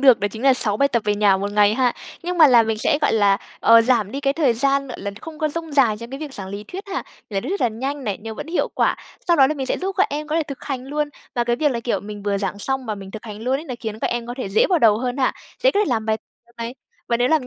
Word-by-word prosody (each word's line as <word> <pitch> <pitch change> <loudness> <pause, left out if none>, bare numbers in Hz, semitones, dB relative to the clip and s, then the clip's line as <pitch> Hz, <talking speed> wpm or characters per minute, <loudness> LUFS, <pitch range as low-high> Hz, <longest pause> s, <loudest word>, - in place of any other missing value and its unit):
được 260 -5 +6
đó 205 - +1
chính 220 +3 -8
là 270 -1 +6
6 210 -5 +1
bài 280 +5 +3
tập 235 -4 0
về 210 0 +2
nhà 205 -2 +4
1 200 +1 -3
ngày 210 0 +4
ha. 250 -1 +2 0.3
Nhưng 355 +1 -3
mà 315 - +9
là 240 -4 +6
mình 220 -1 -1
sẽ, 290 +7 +2
gọi - - +3
là, 205 -3 +4 0.2
ờ, 230 0 +7
giảm 230 -4 +2
đi 275 - -3
cái 275 -1 +2
thời 285 -5 +2
gian, 275 +3 +1
gọi 250 - -8
là, 200 - -3
không 320 -1 -9
có 310 - +1
dông 325 +1 -5
dài 255 -7 +4
trong 235 +1 -9
cái 270 - -6
việc 295 -3 -6
giảng 190 -2 -7
lý 200 +2 -6
thuyết 380 - -7
ha, 390 - -2 0.3
giảng 195 -2 -1
lý - - -4
thuyết 395 - -2
là 245 - +3
nhanh 270 +5 -4
này, 205 -4 -2
nhưng 220 0 -7
vẫn - - -6
hiệu 335 +2 0
quả. - - +2 0.3
Sau 340 - +5
đó 270 -3 +7
là 305 - -1
mình 270 -3 -4
sẽ - - -1
giúp 385 +2 -2
các 385 - +5
em 300 +1 -3
có 310 - 0
thể 330 - +2
thực 280 -3 -7
hành 260 -3 -4
luôn. 295 +1 -1 0.3
Và 240 - +1
cái 240 0 +1
việc 295 +1 +2
là, 235 -3 -2
kiểu, 230 -5 -1
mình 205 +1 -8
vừa 200 -1 0
giảng 195 0 -3
xong 265 +4 -2
và 215 - -2
mình 195 -1 -9
thực 220 +3 -9
hành 210 -1 -8
luôn 255 +3 +1
ấy, 300 - -7
nó 255 -6 -5
khiến 220 -2 -5
các - - -1
em 240 -1 -2
có 240 - -5
thể 255 - -3
dễ 195 - +3
vào 360 - +3
đầu 215 -6 +5
hơn 250 +1 -2
ha, 265 -2 +2 0.3
dễ - - +6
có 410 - +1
thể - - +3
làm 225 -4 0
bài 220 - +2 0.3
tập 235 - -25
này. 230 +2 -4 0.3
Và 235 - +2
nếu 245 +1 +2
làm 310 -4 +2
245 Hz, 335 wpm, -22 LUFS, 215-280 Hz, 0.3 s, mà